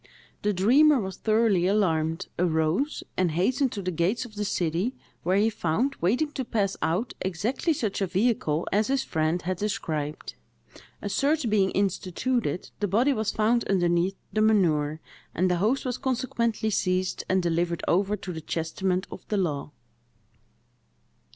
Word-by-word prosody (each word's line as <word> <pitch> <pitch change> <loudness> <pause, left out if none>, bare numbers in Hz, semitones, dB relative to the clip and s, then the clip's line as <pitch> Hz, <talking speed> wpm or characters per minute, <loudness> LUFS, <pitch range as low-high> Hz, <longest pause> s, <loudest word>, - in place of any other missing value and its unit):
The 210 - +1
dreamer 260 +10 +5
was 190 -3 -5
thoroughly 215 -5 +2
alarmed, 165 -4 +1
arose, 170 - +1
and 180 -4 +1
hastened 255 - +1
to 200 - -4
the 185 - -1
gates 180 +9 0
of 230 - -12
the 210 0 -3
city, 180 +5 -1 0.3
where 185 +2 +1
he 215 +2 +3
found, 220 - 0
waiting 250 - +1
to 270 - -3
pass 205 -4 -1
out, 180 +10 0
exactly 205 - -1
such 220 -10 -1
a 195 - +1
vehicle 185 -5 0
as 210 +2 +2
his 270 0 +1
friend 160 -2 0
had 185 0 -2
described. 155 -7 -3 0.7
A - - -2
search 290 -2 +1
being 195 -3 +3
instituted, 195 - -1
the 205 - 0
body 240 +9 +3
was 220 -3 -1
found 230 +2 +2
underneath 175 0 +2 0.2
the 215 - +2
manure; 160 -8 +2 0.4
and 185 +2 +2
the 180 - +2
host 225 +10 +1
was 250 -2 -2
consequently 235 -4 -1
seized, 185 -1 0
and 185 -1 +2
delivered 170 0 0
over 195 +4 +2
to 185 -2 -6
the 160 - -6
chastisement 180 +4 -1
of - - -8
the 210 - -1
law. 150 -7 -1
195 Hz, 155 wpm, -26 LUFS, 175-230 Hz, 0.7 s, dreamer